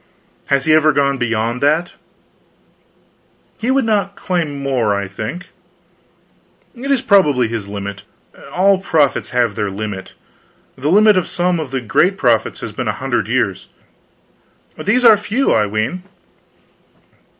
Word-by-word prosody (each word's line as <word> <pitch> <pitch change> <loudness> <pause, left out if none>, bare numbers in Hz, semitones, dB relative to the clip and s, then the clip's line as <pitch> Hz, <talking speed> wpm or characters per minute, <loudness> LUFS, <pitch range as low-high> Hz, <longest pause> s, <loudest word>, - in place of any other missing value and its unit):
"Has 140 -1 +1
he 155 - +4
ever 155 0 +4
gone 140 -1 +1
beyond 115 +1 -1
that?" 155 +5 +1 1.7
"He 230 - -2
would 265 -1 +2
not 200 -3 0
claim 170 -6 -2
more, 125 -7 0
I 100 -1 -3
think." 110 - -7 1.2
"It 260 +3 -7
is 270 -3 +1
probably 150 - +3
his 110 -3 -5
limit. 100 -1 -6 0.5
All 195 +1 +3
prophets 155 -7 +1
have 120 -4 +1
their 105 0 -2
limit. 100 -1 -6 0.6
The 140 +3 -2
limit 210 +2 +5
of 180 - 0
some 175 -1 0
of 155 -4 -5
the 135 0 -3
great 180 - +1
prophets - - +1
has - - -5
been - - -5
a - - 0
hundred - - -2
years." - - -1 1.1
"These 250 0 0
are 225 -2 +9
few, 220 +6 0
I 105 - +2
ween." 110 - -2
145 Hz, 140 wpm, -17 LUFS, 115-195 Hz, 1.7 s, are